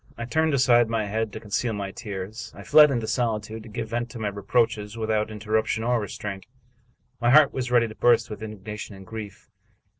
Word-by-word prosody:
I 115 - -4
turned 160 +4 +1
aside 120 -3 +4
my 115 -2 0
head 110 +1 -2
to 110 - -7
con 105 - -15
ceal 115 +1 0
my 100 -1 -4
tears. 100 +2 -7
I - - -10
fled 150 0 +7
into 120 -5 -1
solitude, 110 -2 -2
to 110 - -12
give 110 +1 -5
vent 120 +1 -2
to 115 - -9
my 110 -2 -2
re 100 0 -7
proaches 110 0 0
without 110 -1 0
interruption 110 +1 -1
or 120 -1 +1
restraint. 100 -1 -6 0.7
My 120 0 +2
heart 150 +2 +6
was 130 -1 -3
ready 120 -1 +4
to 110 - -9
burst 120 +1 +3
with 105 - -8
indignation 105 -1 -7
and 95 0 -12
grief. 105 -2 -9
110 Hz, 210 wpm, -25 LUFS, 105-120 Hz, 0.7 s, fled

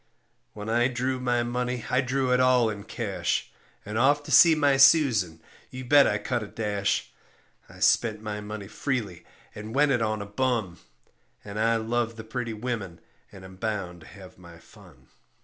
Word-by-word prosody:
When 105 0 -8
I 120 +2 +2
drew 130 +1 -2
my 120 -1 0
money 125 0 -3
I 125 - +3
drew 130 0 0
it 125 - +3
all 125 -3 +3
in 100 -1 -8
cash 100 -7 -3 0.3
And 105 +2 -3
off 145 +3 +3
to - - -9
see 165 -2 +7
my 145 -2 +3
Susan, 120 - +4 0.3
you 130 0 -8
bet 145 +2 +6
I 105 - 0
cut 120 +3 -2
a 105 - -6
dash; 105 -2 -2 0.6
I - - -14
spent 110 -2 +2
my 105 -1 -5
money 105 -1 -7
freely 110 - -4 0.3
and 110 +3 -8
went 145 0 +3
it 125 -3 +1
on 110 -1 -1
a 100 - -5
bum, 105 -4 -2 0.7
And 105 +1 -6
I 115 +1 +2
love 115 +1 -1
the 110 - -8
pretty 120 +1 -4
women 105 -6 -5 0.3
and 95 -1 -12
am 95 0 -13
bound 95 -5 -4
to 80 - -15
have 95 -2 -14
my 85 -1 -14
fun. 85 - -19
110 Hz, 185 wpm, -26 LUFS, 100-125 Hz, 0.7 s, see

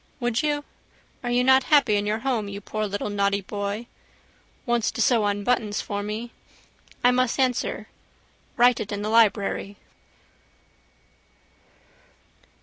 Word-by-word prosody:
Would 240 -2 0
you? 295 -1 -1 0.6
Are 245 - -2
you 245 +1 +2
not 265 0 +5
happy 285 -8 +4
in 205 0 0
your 215 +1 0
home 235 -6 0
you 200 0 -6
poor 215 +1 -3
little 205 +1 -3
naughty 200 0 +1
boy? 205 +3 -4 0.8
Wants 240 -3 +1
to - - -7
sew 230 -4 +3
on 205 0 -1
buttons 215 -3 0
for 205 -1 -3
me. 215 +3 -5 0.7
I 245 - +6
must 255 +1 +1
answer. 255 -2 0 0.7
Write 245 0 +5
it 205 - -5
in 205 0 -3
the 210 - -2
library. 205 -2 +2
220 Hz, 140 wpm, -24 LUFS, 205-245 Hz, 0.8 s, I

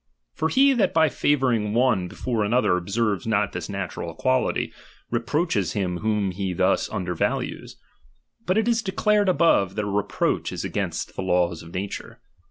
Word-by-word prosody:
For 160 +2 -1
he 275 +5 +5
that 235 -9 +1
by 160 -1 +5
favour 135 -1 +2
ing 105 -1 -1
one 120 -7 +2
before 115 +4 -2
another 110 -3 +2
observes 100 +4 -1
not 105 -2 +1
this 90 -2 -5
natural 95 -3 -4
equality, 130 +10 0 0.4
reproaches 120 - 0
him 90 -4 -1
whom 105 -1 0
he 95 0 -3
thus - - +1
underva^ 90 -2 -1
lues: - - -10 0.7
but 185 +3 +2
it 220 +1 +2
is 235 -1 +2
declared 205 0 +2
above, 130 - +3
that 105 - -1
a - - -3
reproach 100 0 -1
is - - -4
against - - -3
the - - -3
laws 90 -2 +1
of 80 +2 -12
nature. 100 +2 -5
105 Hz, 170 wpm, -24 LUFS, 95-145 Hz, 0.7 s, he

